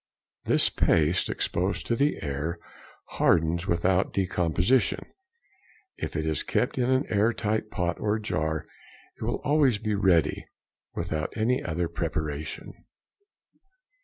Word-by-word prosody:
This - - +3
paste 85 +3 +2
exposed 95 +3 -1
to 120 - +1
the 145 +5 0
air 75 +4 -3 0.5
hardens 85 +2 +1
without 90 +2 +2
decomposition. 90 +4 +1 0.9
If - - -5
it 80 0 -1
is 80 -2 0
kept - - -1
in 125 0 +1
an 130 +2 +2
air 105 +2 +2
tight 110 0 -1
pot 90 -4 -2
or 105 0 +1
jar, 80 -7 -2 0.5
it - - -7
will - - -1
be - - -21
always 140 -6 +3
ready, 95 -6 +2 0.5
without 80 0 -2
any 120 +4 +1
other 85 +1 -1
preparation. 80 -3 -4
90 Hz, 125 wpm, -27 LUFS, 80-110 Hz, 0.9 s, This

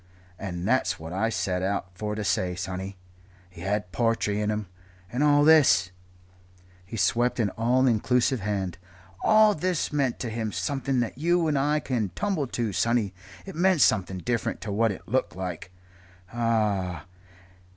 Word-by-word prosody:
And 90 -2 -4
that's 130 +3 +1
what 80 +1 -7
I 110 +5 0
set 90 -5 -1
out 95 -1 -2
for 105 +3 -3
to 105 - -3
say, 90 -1 0
sonny. 95 +2 -5 0.5
He 85 - -12
had 100 0 -2
po'try 110 +3 +1
in 105 +1 -1
him. 105 0 -2 0.5
And 125 +4 0
all 145 0 +5
this" 145 - +5 0.9
he 100 +5 -8
swept 120 +7 +1
an 105 -4 +1
all 125 +3 +2
inclusive 125 +2 +2
hand 95 -4 -3 0.4
"all 215 -1 +6
this 180 -2 -1
meant 135 -4 +1
to 120 - -3
him 110 -1 -3
something 135 -1 -1
that 120 +2 -4
you 170 +1 +2
and 150 - +1
I 145 +2 +2
can't 110 -9 -2
tumble 185 -9 -1
to, 115 -4 -2
sonny. 115 -2 +1 0.3
It 195 - -8
meant 180 -1 +3
something 95 0 +3
different 115 +5 -2
to 105 - -4
what 110 +2 +2
it 95 - -9
looked 130 -2 0
like 90 -1 -5 0.6
ah!" 105 -8 0
110 Hz, 160 wpm, -26 LUFS, 95-130 Hz, 0.9 s, all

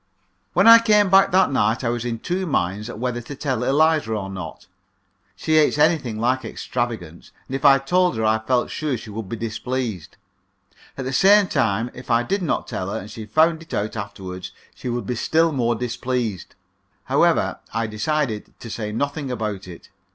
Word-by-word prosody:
When - - +3
I 230 0 +10
came 210 -4 +3
back 195 0 +6
that 185 -3 +3
night 115 -1 +1
I 115 - 0
was 120 0 -2
in 120 -1 -2
two 180 +9 -3
minds 105 - -1
whether 120 +1 -3
to 140 +4 -8
tell 130 -4 -2
Eliza 150 -1 +2
or 100 -2 -4
not. 90 -4 -8 0.7
She 155 0 +1
hates 150 -1 +3
anything 150 -8 +2
like 130 +3 +1
extravagance, 110 -7 -5
and 135 - -5
if 135 - -4
I 140 -2 +7
told 175 +2 +1
her 110 - 0
I 110 +1 +3
felt 120 +2 0
sure 150 -5 -2
she 110 -1 -10
would 105 -2 -6
be 115 - -3
displeased. 115 -4 -4 0.8
At 135 - -4
the 130 - -3
same 200 +7 +6
time, 115 - 0
if 125 - -11
I 120 0 +3
did 195 +11 -1
not 170 - -1
tell 90 - -4
her, - - -3
and 105 +3 -8
she 110 0 -8
found 160 +7 +3
it 165 - -7
out 105 +2 -2
afterward, 95 -3 -6 0.2
she 125 - -6
would 120 -3 -3
be 125 - -2
still 160 +7 +2
more 120 -4 0
displeased. 120 -4 -3 0.5
However, - - +2
I 115 +1 -1
decided 110 +1 -2
to 115 - -8
say 105 -2 -4
nothing 140 +4 -2
about 105 -6 -4
it. 85 -2 -12
120 Hz, 190 wpm, -22 LUFS, 110-150 Hz, 0.8 s, I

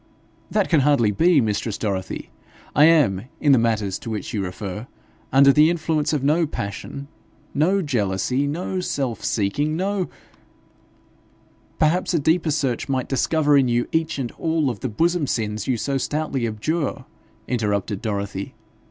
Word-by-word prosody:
'That 210 -2 +1
can 165 - +3
hardly 135 -6 +3
be, 165 - +4
mistress 110 -2 -1
Dorothy. 95 -4 -4 0.4
I 145 - +7
am, 135 - +4
in 145 - +3
the 130 - +6
matters 110 -4 0
to - - -7
which 110 +2 -4
you 105 -3 -1
refer, 100 +4 -6 0.4
under 140 +1 +6
the 150 +2 +6
influence 160 -3 0
of 150 -4 -1
no 155 +3 +2
passion, 140 +5 -6 0.5
no 185 +7 +2
jealousy, 125 - 0
no 180 +5 -3
self 135 -9 -2
seeking, 145 +10 0
no 195 0 -1 0.8
' - - -34
'Perhaps 175 +3 +2
a - - +3
deeper 160 +3 +2
search 140 -4 -1
might 130 -2 -1
discover 145 +3 +2
in 135 -2 +4
you 120 0 +1
each 160 -1 0
and 125 -4 -3
all 160 -4 +1
of 110 - -8
the 130 - -3
bosom 165 +6 +1
sins 105 -3 -2
you 130 -3 +1
so 135 +4 -1
stoutly 140 -3 -1
abjure,' 145 +8 -2 0.4
interrupted 105 -4 -1
Dorothy. 100 -3 -4
135 Hz, 155 wpm, -22 LUFS, 110-155 Hz, 0.8 s, I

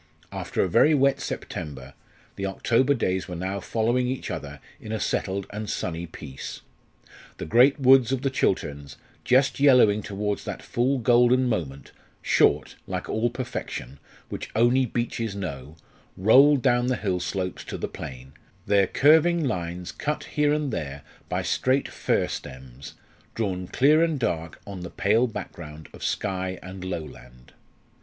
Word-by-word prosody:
After - - -2
a - - +1
very 150 - +4
wet 140 -1 +3
September, 70 -3 -6 0.4
the 100 - -3
October 120 +8 +2
days 95 -6 -1
were 90 - -6
now 95 +3 -3
following 120 +5 0
each 130 +1 -3
other - - -6 0.2
in 110 - -8
a 110 - -2
settled 95 0 -1
and 105 0 -5
sunny 85 0 -3
peace. 70 -4 -8 0.8
The - - -5
great 125 - +5
woods 130 -2 +6
of 135 0 -1
the 135 - +1
Chilterns, 75 - -1 0.3
just 130 +2 +3
yellowing 125 -7 +5
towards 100 0 -3
that - - -6
full 130 +3 0
golden 125 +1 +4
moment 75 - -3 0.3
short, - - +2
like - - -4
all 115 +2 +1
perfection, 115 - -6 0.3
which - - -6
only 120 +3 +3
beeches 115 -2 -3
know, 75 -7 -6 0.4
rolled 130 +8 +6
down 120 -2 +3
the 130 - +1
hill 95 -6 -1
slopes 90 0 -3
to - - -5
the - - -3
plain, 65 +1 -9 0.3
their 100 -1 +3
curving 160 - +4
lines 90 -6 -3
cut 150 +1 -3
here 150 -1 +1
and 150 -4 -1
there 70 -6 -5 0.3
by - - -1
straight 130 +2 +1
fir - - 0
stems, 65 +1 -9 0.4
drawn 95 -5 -2
clear 150 - +4
and 160 -4 0
dark 80 - -2
on 100 -2 -7
the 90 -1 -6
pale 110 +6 +2
background 80 - -8
of - - -11
sky 95 -2 -2
and 95 0 -8
lowland. 75 -9 -8
105 Hz, 150 wpm, -25 LUFS, 85-130 Hz, 0.8 s, woods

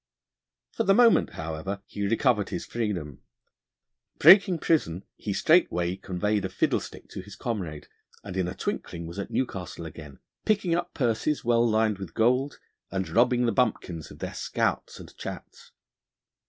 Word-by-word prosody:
For 230 - -1
the 195 -2 +4
moment, 235 -1 +5
however, 80 +5 -5
he 100 -1 -3
recovered 115 -1 +2
his - - -4
freedom: 95 - -3 1.0
breaking 185 +2 +7
prison, 100 - 0
he 105 - -5
straightway 95 - +3
conveyed 100 +2 -1
a 95 - -2
fiddlestick 95 - -2
to - - -7
his 100 +2 -12
comrade, 90 -11 -4 0.4
and 100 -3 -7
in 95 -2 0
a - - -5
twinkling 85 -1 -4
was 85 +4 -7
at 100 - -4
Newcastle 95 -9 -3
again, 75 -3 -10 0.3
picking 205 -5 +1
up 175 +1 -2
purses 125 +3 0
well 120 0 +3
lined 110 -2 +1
with 95 -4 -8
gold, 125 +5 +2 0.3
and 95 -3 -3
robbing 120 +6 +3
the 115 - +2
bumpkins 100 -8 -1
of - - -12
their - - -5
scouts - - -2
and - - -12
chats. - - -9
105 Hz, 155 wpm, -27 LUFS, 90-125 Hz, 1.0 s, breaking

